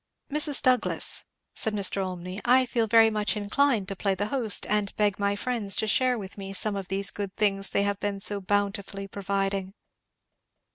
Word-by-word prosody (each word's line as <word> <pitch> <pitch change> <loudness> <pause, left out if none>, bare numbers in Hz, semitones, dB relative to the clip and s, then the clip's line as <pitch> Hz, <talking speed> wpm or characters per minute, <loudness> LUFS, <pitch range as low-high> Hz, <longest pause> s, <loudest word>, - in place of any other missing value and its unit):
"Mrs. 295 -1 +2
Douglass," 255 -2 +1 0.3
said 220 -1 -1
Mr. 200 -1 +2
Olmney, 185 +1 -6
"I 255 +1 +4
feel 235 -2 -1
very 225 +1 +5
much 210 0 0
inclined 210 0 0
to 195 - -5
play 195 +1 -1
the 205 +2 -2
host, 245 -6 +2
and 210 -1 -1
beg 205 -2 0
my 200 0 0
friends 215 -3 +3
to - - +1
share 250 +3 +2
with 200 -1 -9
me 195 0 -7
some 205 +1 +2
of 195 -2 -5
these 195 +1 0
good 200 -2 -6
things 195 -2 +1
they 200 - 0
have 200 0 -2
been 205 -1 -3
so 200 0 +1
bountifully 200 0 -2
providing." 195 0 -3
205 Hz, 185 wpm, -26 LUFS, 195-220 Hz, 0.3 s, very